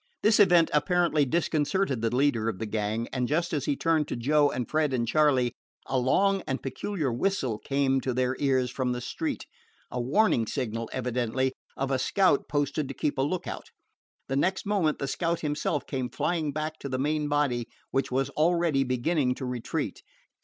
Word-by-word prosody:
This 215 +1 +4
event 175 -5 +5
apparently 165 -1 +2
disconcerted 155 - 0
the 115 +1 0
leader 125 -5 +2
of 110 - -4
the 110 - -3
gang, 110 +2 -2
and 125 -2 0
just 170 +5 0
as 145 -3 -1
he 145 - +1
turned 160 -1 +1
to - - -3
Joe 145 +4 +3
and 125 -3 -3
Fred 155 -3 +1
and 120 -2 0
Charley, 130 -3 +3 0.3
a 130 - 0
long 195 +10 +2
and 135 - -2
peculiar 140 - -2
whistle 130 - -1
came 135 -1 +1
to 130 - -1
their 125 +1 0
ears 130 -3 +1
from 125 -1 -1
the 125 - -3
street 295 - -3 0.5
the 125 - -3
warning 125 - +2
signal, 115 -4 -3
evidently, 125 +1 -1 0.2
of 135 0 -1
a 130 - +1
scout 185 +1 +2
posted 145 0 0
to 135 - -7
keep 145 -2 -1
a - - +4
lookout. 170 +6 -3 0.6
The 135 - -2
next 185 +7 0
moment 195 -7 +1
the 140 - -3
scout 170 +4 -1
himself 150 -1 -1
came 130 -2 -3
flying 160 -4 -1
back 155 +2 -4
to 140 - -6
the 130 - -1
main 150 +2 0
body, 140 -5 +1 0.2
which 135 -1 0
was 135 +1 0
already 165 -3 +2
beginning 130 +1 0
to 130 - -5
retreat. 125 -2 -3
140 Hz, 185 wpm, -27 LUFS, 125-155 Hz, 0.6 s, event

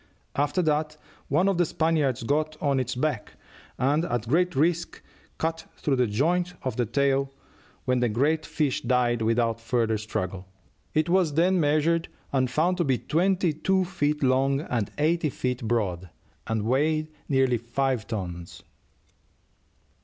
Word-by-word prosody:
After 145 +6 +1
that 155 0 0 0.3
one 170 +7 +2
of 195 -3 +1
the 175 - +4
Spaniards 150 -8 0
got 155 +4 0
on 140 -2 +1
its 125 -1 -2
back, 130 -4 -2 0.4
and 145 +5 +2
at 120 -7 -2
great 175 +6 +2
risk 170 +4 0 0.4
cut 160 0 -2
through 140 -3 0
the 125 -1 +3
joint 175 +11 0
of 130 - -2
the 120 -3 0
tail, 135 +2 +1 0.5
when 125 -1 +2
the 120 -1 +2
great 145 +8 +1
fish 150 -5 -1
died 120 -2 +1
without 115 0 +1
further 115 -2 0
struggle. 95 -3 -4 0.5
It 155 +1 +2
was 175 -4 +2
then 180 +3 +3
measured, 160 +2 +2 0.3
and 130 -2 +2
found 170 +7 +1
to 175 - +2
be 135 -5 +1
twenty 180 +3 +1
two 190 +5 +1
feet 150 -5 -1
long 135 +2 +2
and 120 -9 -2
eight 155 0 +1
feet 125 -1 -2
broad, 95 -6 -1 0.4
and 110 -1 -1
weighed 155 +6 +1 0.2
nearly 130 -3 +3
five 120 -1 -1
tons." 90 -6 -6
140 Hz, 150 wpm, -26 LUFS, 120-160 Hz, 0.5 s, the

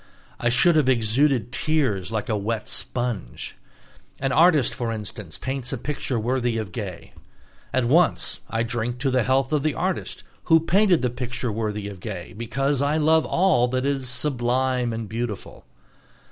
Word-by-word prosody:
I 120 - +1
should 155 +8 +4
have 145 -4 +3
exuded 120 +1 +2
tears 125 - 0
like 110 -2 -2
a 110 - 0
wet 105 +2 -2
sponge. 120 - -3 0.6
An 135 0 0
artist, 155 -4 +4
for 120 -2 -2
instance, 105 -6 -6
paints 130 -1 -3
a 135 - -2
picture 130 -1 -2
worthy 120 0 0
of 110 -5 -4
Gay. 95 -3 -7 0.6
At 130 -2 +1
once 160 +8 +3
I 115 0 0
drink 120 +1 -2
to 135 -1 +1
the 130 0 +3
health 130 +4 +1
of 150 - +2
the 155 +1 0
artist 185 0 -3 0.2
who 165 0 +6
painted 180 -1 +3
the 125 - +1
picture 125 -1 -3
worthy 105 -1 -3
of 100 -2 -8
Gay, 95 -3 -6
because 135 +5 -1
I 145 +2 +1
love 160 +1 +3
all 170 -9 +3
that 130 +1 -1
is 135 -3 -1
"sublime 125 -1 0
and 115 -1 -4
beautiful." 110 - -5
125 Hz, 165 wpm, -24 LUFS, 115-140 Hz, 0.6 s, who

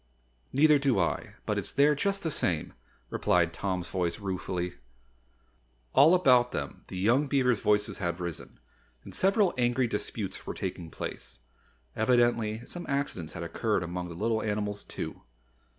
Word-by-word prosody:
"Neither 150 +1 +5
do 135 -5 +2
I, 85 - -1
but - - 0
it's - - -4
there 145 +2 +4
just 195 +7 -1
the 160 - -1
same," 85 - -1 0.4
replied 85 -2 +2
Tom's 95 -1 -2
voice 90 -3 -1
ruefully. 90 -2 -3 1.2
All 160 +6 +7
about 125 -8 +5
them - - -4
the 95 - -7
young 120 +10 +3
beavers' 125 -5 +2
voices 105 0 +1
had 85 -2 -2
risen, 85 -2 -6 0.4
and - - -11
several 195 0 +3
angry 120 +1 +2
disputes 105 -3 -4
were - - -4
taking 90 -3 -4
place. - - -7 0.6
Evidently 115 -1 +2
some 175 0 -7
accidents 140 - -2
had 85 - -5
occurred 100 +4 0
among 90 +1 -4
the 85 - -8
little 110 +5 0
animals, 105 -1 -2
too. - - -6
110 Hz, 150 wpm, -29 LUFS, 90-135 Hz, 1.2 s, All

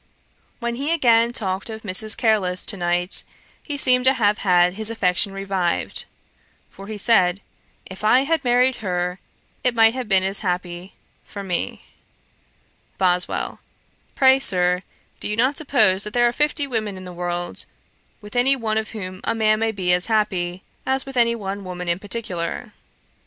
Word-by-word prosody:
When 235 -1 -3
he 285 +4 -2
again 235 -7 +4
talked 195 -3 -3
of 220 0 -7
Mrs. 215 +2 +2
Careless 200 -6 +1
to - - 0
night, 175 0 0 0.4
he 290 -2 -5
seemed 250 -2 +4
to 265 +1 +5
have 210 -2 +2
had 180 -2 +3
his 220 +2 0
affection 195 -3 +1
revived; 195 -3 -2 0.7
for 195 - -11
he 215 0 -5
said, 195 -4 +3 0.5
'If 190 +2 -10
I 245 +5 +5
had 310 +2 0
married 250 0 +3
her, 180 -3 -2 0.4
it 250 -1 +1
might 225 0 +5
have 255 -2 -4
been 190 -2 +4
as 195 +1 +1
happy 180 0 -4 0.3
for 200 - -8
me.' 180 -3 -3 1.1
BOSWELL. 180 -1 0 0.6
'Pray, 265 -2 +5
Sir, 180 -6 +2 0.4
do - - -2
you 210 - -1
not 255 +5 +2
suppose 215 -11 +2
that 210 - -4
there 240 0 +4
are 240 - 0
fifty 295 +1 0
women 215 -7 -3
in 185 - -9
the 180 - -8
world, 175 0 -3 0.6
with 210 +1 -12
any 255 +3 +4
one 220 -4 -1
of 220 - -5
whom 185 -1 -7
a - - -1
man 215 -1 +2
may 225 0 +1
be 185 -4 0
as 180 0 +1
happy, 190 -5 -1 0.2
as 265 0 -1
with 270 -1 -8
any 235 -1 +3
one 200 -2 -5
woman 180 -1 -6
in 170 +1 0
particular.' 205 0 -4
210 Hz, 170 wpm, -22 LUFS, 185-235 Hz, 1.1 s, to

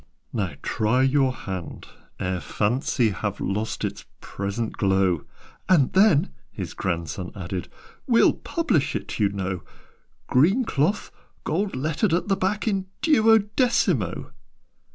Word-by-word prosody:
"Now 95 -9 -2
try 115 +5 +1
your 135 0 +3
hand, 95 -7 -6 0.3
ere 90 0 -1
Fancy 115 +1 0
Have 100 +1 -3
lost 105 +3 -2
its - - -5 0.2
present 100 +3 -4
glow 95 -5 +1 0.2
" - - -27
"And 155 -8 +4
then," 190 - +4 0.2
his - - -6
grandson 85 0 -3
added, 90 -2 -5 0.4
"We'll 235 -3 +5
publish 230 - 0
it, - - -4
you 105 -2 +3
know: 95 -2 -3 0.6
Green 190 - +3
cloth 165 +3 0 0.3
gold 195 +5 -1
lettered 155 +7 +1
at 180 - -2
the 195 - +4
back 195 +4 -1
In 195 -3 0 0.2
duodecimo!" 220 - +2
130 Hz, 125 wpm, -24 LUFS, -, 0.6 s, We'll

